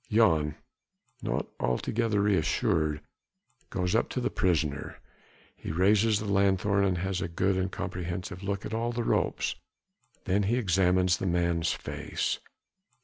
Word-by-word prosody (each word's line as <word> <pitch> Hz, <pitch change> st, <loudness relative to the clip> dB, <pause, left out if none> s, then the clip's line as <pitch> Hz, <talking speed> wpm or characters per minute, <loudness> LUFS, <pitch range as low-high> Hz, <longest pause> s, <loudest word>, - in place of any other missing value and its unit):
Jan 80 Hz, -10 st, +3 dB, 0.7 s
not -, -, -1 dB
altogether 105 Hz, -, 0 dB
re 105 Hz, -1 st, +3 dB
assured 75 Hz, -1 st, +1 dB, 0.7 s
goes 90 Hz, 0 st, -1 dB
up 115 Hz, -, +2 dB
to -, -, -2 dB
the 125 Hz, -, -1 dB
prisoner. 75 Hz, -6 st, 0 dB, 0.6 s
He -, -, -6 dB
raises 105 Hz, +5 st, +3 dB
the 110 Hz, -, -4 dB
lanthorn 100 Hz, 0 st, +2 dB
and 95 Hz, -2 st, +1 dB
has 95 Hz, +1 st, -2 dB
a -, -, -1 dB
good 95 Hz, +3 st, 0 dB
and 95 Hz, 0 st, -1 dB
comprehensive 90 Hz, +1 st, -4 dB
look 100 Hz, 0 st, -3 dB
at 110 Hz, -, -5 dB
all 115 Hz, +1 st, 0 dB
the 120 Hz, 0 st, -2 dB
ropes. -, -, 0 dB, 0.7 s
Then 100 Hz, +2 st, +2 dB
he 105 Hz, +5 st, +1 dB
examines 90 Hz, -3 st, +3 dB
the 95 Hz, -, -2 dB
man's 85 Hz, -1 st, +1 dB
face. -, -, -3 dB
95 Hz, 145 wpm, -29 LUFS, 85-105 Hz, 0.7 s, Jan